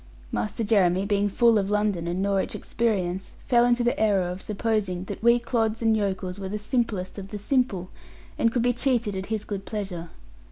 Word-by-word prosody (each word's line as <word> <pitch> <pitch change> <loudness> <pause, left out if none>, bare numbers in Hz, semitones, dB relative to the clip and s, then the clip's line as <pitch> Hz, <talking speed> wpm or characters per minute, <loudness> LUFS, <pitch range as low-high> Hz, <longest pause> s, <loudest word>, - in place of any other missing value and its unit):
Master 215 +2 -2
Jeremy, 195 -3 +3
being 205 0 +1
full 230 +1 +4
of 195 0 -1
London 205 -5 0
and 180 +3 -1
Norwich 195 -1 0
experience, 190 -5 -2
fell 240 -1 +4
into 240 0 +3
the 240 - +1
error 200 -4 +3
of 180 +1 -5
supposing 210 -4 -1
that - - -7
we 235 +1 +5
clods 230 -2 -1
and 225 -1 +4
yokels 190 -2 -2
were 190 -1 -4
the 210 - -2
simplest 210 -4 -2
of 195 - -7
the 210 - -6
simple, 205 -5 0 0.4
and 230 - +2
could 240 -1 0
be 245 0 +3
cheated 240 -5 0
at 190 0 -4
his 220 -1 -2
good 200 -2 -4
pleasure. 190 -6 -5
205 Hz, 195 wpm, -26 LUFS, 190-230 Hz, 0.4 s, we